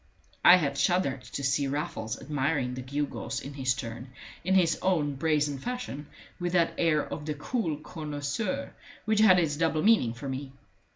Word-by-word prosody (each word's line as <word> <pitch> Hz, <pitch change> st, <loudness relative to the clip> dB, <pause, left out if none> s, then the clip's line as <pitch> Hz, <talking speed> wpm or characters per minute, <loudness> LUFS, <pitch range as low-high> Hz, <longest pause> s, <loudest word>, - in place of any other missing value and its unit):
I 175 Hz, -, +10 dB
had 140 Hz, -6 st, 0 dB
shuddered 140 Hz, -8 st, +1 dB
to 140 Hz, -, -6 dB
see 140 Hz, +1 st, +1 dB
Raffles 125 Hz, -6 st, -3 dB
admiring 135 Hz, -2 st, -1 dB
the 130 Hz, -, -5 dB
gewgaws 140 Hz, +3 st, -3 dB
in 140 Hz, -, -8 dB
his 130 Hz, -2 st, 0 dB
turn, 120 Hz, 0 st, -7 dB, 0.3 s
in 190 Hz, +3 st, +2 dB
his 170 Hz, -4 st, +3 dB
own 160 Hz, -6 st, +1 dB
brazen 145 Hz, -1 st, 0 dB
fashion, 245 Hz, -, -5 dB, 0.3 s
with 175 Hz, 0 st, -2 dB
that 170 Hz, -2 st, +3 dB
air 155 Hz, -3 st, +2 dB
of 150 Hz, -, -6 dB
the 150 Hz, -, -2 dB
cool 160 Hz, -, -2 dB
connoisseur 155 Hz, -, -4 dB, 0.3 s
which 220 Hz, -1 st, +2 dB
had 205 Hz, -4 st, +7 dB
its 155 Hz, -4 st, +1 dB
double 160 Hz, -1 st, +1 dB
meaning 205 Hz, -, +4 dB
for 125 Hz, +4 st, -7 dB
me. 135 Hz, 0 st, -5 dB
150 Hz, 170 wpm, -28 LUFS, 135-175 Hz, 0.3 s, I